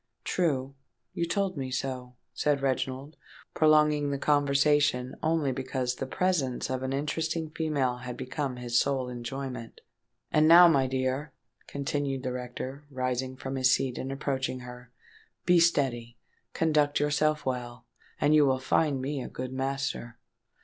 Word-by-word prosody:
"True—you 135 0 -3
told 195 0 -1
me 130 -2 -3
so," 130 -1 -4 0.2
said 145 -2 0
Reginald, 135 +2 -2 0.4
prolonging 150 -2 +4
the 140 - -1
conversation 145 -2 +2
only 155 -3 +1
because 130 -1 -2
the 135 +1 -5
presence 145 -7 0
of 130 0 -2
an 130 0 -2
interesting 155 +3 -2
female 145 -6 0
had 125 0 -7
become 130 +1 -3
his 120 -1 +1
sole 135 -3 0
enjoyment. 125 0 -6 0.5
"And 155 0 +4
now, 175 +2 +9
my 135 -5 +3
dear," 130 +2 -2 0.3
continued 140 -1 -2
the 130 - -2
rector, 125 +3 -6
rising 130 -1 -2
from 135 +1 -4
his 130 0 +4
seat, 130 -2 -3
and 135 - -4
approaching 135 -2 -2
her, 125 0 -11 0.5
"be 180 0 +5
steady—conduct 145 +1 0
yourself 150 +1 +1
well—and 125 +3 -3
you 155 -1 +6
will 130 -1 +2
find 135 0 +1
me 140 0 -2
a - - -6
good 130 0 -6
master." 135 -3 -3
135 Hz, 135 wpm, -28 LUFS, 130-150 Hz, 0.5 s, now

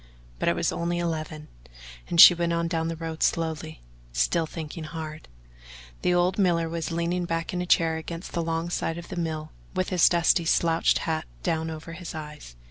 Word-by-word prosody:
But - - +2
it - - +1
was - - 0
only 170 +1 -2
eleven, 155 -3 -3 0.6
and 170 - 0
she 175 - +12
went 170 0 -1
on 170 0 0
down 165 -1 -1
the 165 - -3
road 160 0 -6
slowly, 160 - -1 0.3
still 60 - +1
thinking 160 0 -7
hard. 155 -1 -7 0.7
The - - +2
old 180 +2 +2
miller 170 -4 +2
was 165 -1 -3
leaning 170 +1 -1
back 165 0 -2
in 180 - -1
a 180 - -4
chair 165 -2 +3
against 165 +2 -7
the 170 - -1
log 165 +1 -2
side 165 -1 -2
of 170 - -9
the - - -5
mill, 160 -2 -3 0.2
with 185 0 0
his 180 -2 +5
dusty 170 0 +3
slouched 165 0 +3
hat 160 -1 -1 0.2
down 160 0 -1
over 160 +1 -7
his 170 -1 -7
eyes. 150 - -9
165 Hz, 195 wpm, -26 LUFS, 160-170 Hz, 0.7 s, she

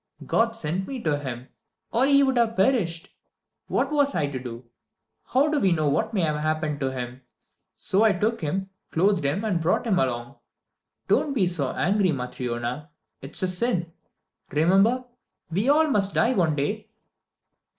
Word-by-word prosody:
God 230 0 +1
sent 180 0 -3
me 270 -2 -5
to 150 -3 +1
him, 130 -3 -6 0.4
or 250 +4 +3
he 280 0 +5
would 265 -1 +2
have 230 -1 +2
perished. 190 -6 +1 0.5
What 275 - 0
was 285 -2 +2
I 155 - +1
to 140 -2 -4
do? 120 -1 -8 0.6
How 270 +4 +3
do 300 -1 +1
we 195 -6 +2
know 155 -3 +2
what 220 +10 0
may 205 -5 0
have 155 -2 0
happened 155 -1 -1
to 135 -1 -1
him? 125 0 -6 0.6
So 195 - +1
I 220 -1 +5
took 215 +5 -1
him, 190 +5 -3 0.2
clothed 190 0 +2
him, 145 +9 -1
and 185 -6 0
brought 175 +8 +1
him 195 -6 +2
along. 120 -1 -2 0.7
Don't 290 - +2
be 200 -7 +3
so 165 -7 -1
angry, 195 0 +2
Matryona. 125 +1 -4 0.3
It 135 +3 -10
is - - 0
a - - +3
sin. 180 -2 -1 0.6
Remember, 195 - +3 0.5
we 200 +10 +1
all 310 +2 +5
must 200 -9 +1
die 240 +3 +3
one 165 -9 +1
day." 210 +10 -3
180 Hz, 170 wpm, -25 LUFS, 145-225 Hz, 0.7 s, he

